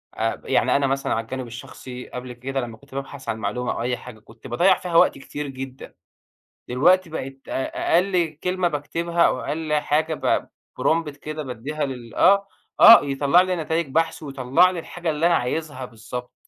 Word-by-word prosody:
آآ، - - -2
يعني - - +2
أنا 140 -1 +2
مثلًا 135 0 -1
على 115 - -1
الجانب 130 +2 -6
الشخصي 125 +1 -9
قبل 125 0 -7
كده 135 +3 -3
لمّا 115 -2 -7
كنت 140 +2 -16
بابحث 140 0 -6
عن 110 - -1
معلومة 110 +4 -2
أو - - -4
أي 125 +1 -1
حاجة 120 -3 -11
كنت 115 +3 -14
باضيّع 175 +10 +3
فيها 175 -2 -5
وقت - - +5
كتير 145 +2 -6
جدًا، 135 -1 -8 0.8
دلوقتي 175 +8 +3
بقيت 135 -3 -6
أ 135 +4 -1
أقل 175 -4 +1
كلمة 180 -1 +1
باكتبها 170 +3 -2
أو 125 - +2
أقل 155 +1 -3
حاجة 155 +1 +1 0.3
p - - -20 0.4
prompt 160 -1 +2
كده 155 +1 -6
بادّيها 135 +4 -4
لل 125 -4 -8
آه، 200 +1 +5 0.3
آه، 230 - +10
يطلّع 140 +4 +4
لي 185 0 0
نتايج 160 -1 -1
بحث 160 +2 0
ويطلّع 135 +5 +3
لي 175 - -4
الحاجة 175 0 -5
اللي 155 +2 +2
أنا 175 - +4
عايزها 130 +1 -2
بالضبط، 125 +2 -8
140 Hz, 180 wpm, -23 LUFS, 125-165 Hz, 0.8 s, آه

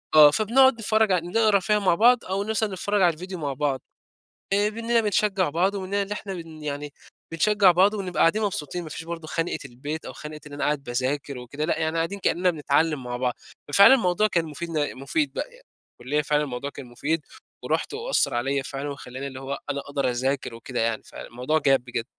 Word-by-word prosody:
آه. 150 -1 +9
فبنقعد 255 - +4
نتفرّج 220 -2 +1
على 175 -2 +1
نقرا 215 +1 +3
فيها 210 +3 +1
مع 190 -4 +3
بعض، 240 +4 +4
أو 195 +2 -1
مثلًا 220 0 0
نتفرّج 205 +2 0
على 175 -2 +5
الفيديو 185 +3 -7
مع 145 -3 -3
بعض. 135 -1 -1 0.7
آآ 205 +1 +3
منّنا 230 +1 +1
بنشجّع 205 -3 +1
بعض 175 +7 +1
ومنّنا 200 +1 -1
اللي 200 +1 -5
إحنا 195 -2 -6
بن 165 -3 -9
يعني 145 0 -4 0.4
بنشجّع 200 +3 +4
بعض، 190 +4 +4
ونبقى 190 -4 -3
قاعدين 210 +7 +4
مبسوطين 175 -4 -2
ما 160 - -8
فيش 160 - -7
برضه 165 -1 -6
خَنقِة 165 +2 -2
البيت 140 +5 -6
أو - - -7
خَنقِة 150 0 -9
إن 150 - -11
أنا 145 - -3
قاعد 145 -1 0
باذاكر 130 +3 -2
وكده 135 +5 -5
لأ، 160 - 0
يعني 160 0 -1
قاعدين 165 +5 -1
كإنّنا 180 -1 +2
بنتعلّم 150 -2 +1
مع 120 0 -4
بعض. 125 -1 -1 0.3
ففعلًا 200 - +8
الموضوع 210 -4 +2
كان 170 -5 +1
مفيد 165 +2 -6
ن 150 -3 -1
مفيد 290 - -1
بقى - - -4
يع - - -17 0.4
الكُلّية 145 +5 0
فعلًا 150 0 +1
الموضوع 140 0 -4
كان 140 -2 -10
مفيد، 145 +6 -2 0.4
ورُحت - - -1
وأثَّر 460 - 0
عليّا 135 +3 0
فعلًا، 140 +1 -5
وخلّاني 135 -1 -7
اللي 130 -1 -7
هو 135 +1 -4
أنا 140 0 -2
أقدر 140 -2 -1
أذاكر 130 0 -2
وكده 120 +2 -5
يعني، 115 -1 0
فالموضوع 125 +6 -3
جاب 135 -4 +3
بجد. 120 -2 -3
160 Hz, 205 wpm, -25 LUFS, 140-200 Hz, 0.7 s, آه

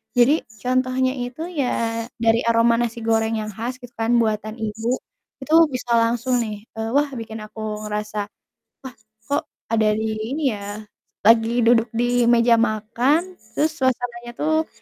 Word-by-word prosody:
Jadi 255 +6 +4 0.2
contohnya 255 +1 +1
itu 245 +4 -5
ya 230 -7 -1 0.2
dari 230 0 +3
aroma 230 0 +4
nasi 235 0 -1
goreng 225 0 +1
yang 215 - -4
khas 230 +4 -4
gitu 245 -1 -12
kan 225 +1 +1
buatan 215 -1 -1
ibu, 220 +1 -3 0.5
itu 305 +4 -3 0.2
bisa 250 -1 -4
langsung 235 +2 +1
nih, 210 -2 -6
eee, 225 0 -3
wah 290 +1 +4
bikin 225 -1 -6
aku 215 0 -6
ngerasa 210 0 -3 0.6
wah 260 -2 -9 0.3
kok 285 +1 0 0.3
ada 220 -1 +3
di 220 0 -2 0.2
ini 295 -4 +1
ya, 205 +1 -7 0.4
lagi 225 +2 +5
duduk 230 0 +4
di 245 0 +2
meja 235 0 +5
makan 240 - +1 0.2
terus 305 +5 +2
suasananya 240 -2 -1
tuh 315 +1 +1
230 Hz, 150 wpm, -22 LUFS, 220-250 Hz, 0.6 s, lagi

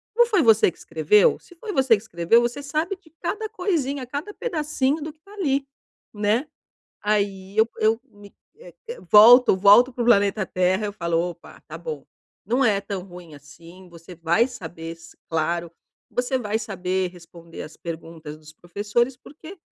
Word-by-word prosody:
Não 475 0 +6
foi 405 -7 +2
você 225 -6 +5
que - - -25
escreveu? 165 +5 +3
Se - - -19
foi 415 +4 -7
você 260 -4 +4
que - - -11
escreveu, 170 +2 +2
você 240 +4 -3
sabe 310 +7 -2
de 365 -4 -24
cada 435 0 -3
coisinha, 285 -8 -2
cada 295 +11 -6
pedacinho 305 - -1
do 305 +1 -5
que 310 - -31
está 400 +5 -18
ali". 280 -8 -1 0.5
Né? 215 +7 0 0.6
Aí 200 -2 -1
eu 220 +1 +5
eu 220 +1 +2
me 205 -2 -17 0.2
eh, - - -14 0.4
volto 235 +2 +8
volto 210 +7 +6
para 245 - -3
o - - -2
planeta 200 -3 +3
Terra, 185 +3 0
eu 205 - -5
falo: 170 -2 -1
"Opa, 170 0 -5
está - - -11
bom. 475 -2 -7 0.4
Não 255 +4 +1
é 205 -3 +2
tão 195 -2 -5
ruim 175 -4 -12
assim, 165 +5 -15
você 170 +1 -13
vai 170 +9 +1
saber 165 -7 -8
s 165 0 -15
claro, 170 +1 -1 0.4
você 250 +1 -1
vai 215 -2 -2
saber 190 -3 -2
responder 170 -1 -12
as 155 - -11
perguntas 165 -2 -8
dos 155 0 -15
professores, 205 +9 -2
porque 315 +7 -13
210 Hz, 175 wpm, -23 LUFS, 175-270 Hz, 0.6 s, volto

